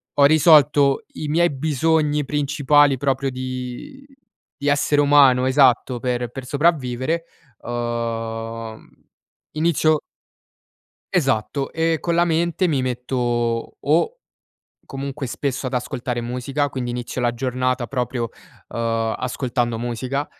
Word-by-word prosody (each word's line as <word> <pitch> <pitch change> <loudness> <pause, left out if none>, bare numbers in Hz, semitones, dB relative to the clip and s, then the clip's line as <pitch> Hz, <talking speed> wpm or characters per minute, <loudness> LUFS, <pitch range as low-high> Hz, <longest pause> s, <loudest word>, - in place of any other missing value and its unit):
ho 140 - +6
risolto 150 -2 +5
i 150 - -5
miei 170 +3 +3
bisogni 150 +1 +1
principali 145 0 +3
proprio 135 0 -1
di 130 - -6 0.5
di 145 - -4
essere 145 0 +2
umano 140 -3 +5
esatto, 130 -2 +3
per 125 -2 -1
per 130 +1 -8
sopravvivere, 145 +1 0 0.4
uhm, 115 -1 -4 0.7
inizio 155 -1 +2 1.1
Esatto. 135 -3 0
E 165 0 +1
con 170 -1 -1
la 170 - +4
mente 170 +2 +1
mi 140 -5 +1
metto 120 -2 -2
o 170 - +1 0.7
comunque 135 0 -5
spesso 135 +1 -3
ad 130 - -3
ascoltare 125 -1 -3
musica, 135 +4 -2
quindi 125 -2 -4
inizio 125 +1 -4
la 120 -1 0
giornata 125 0 -1
proprio, 125 -3 -2 0.4
uhm, 115 -1 -1
ascoltando 125 -2 -2
musica. 125 +4 -3
130 Hz, 110 wpm, -21 LUFS, 120-145 Hz, 1.1 s, ho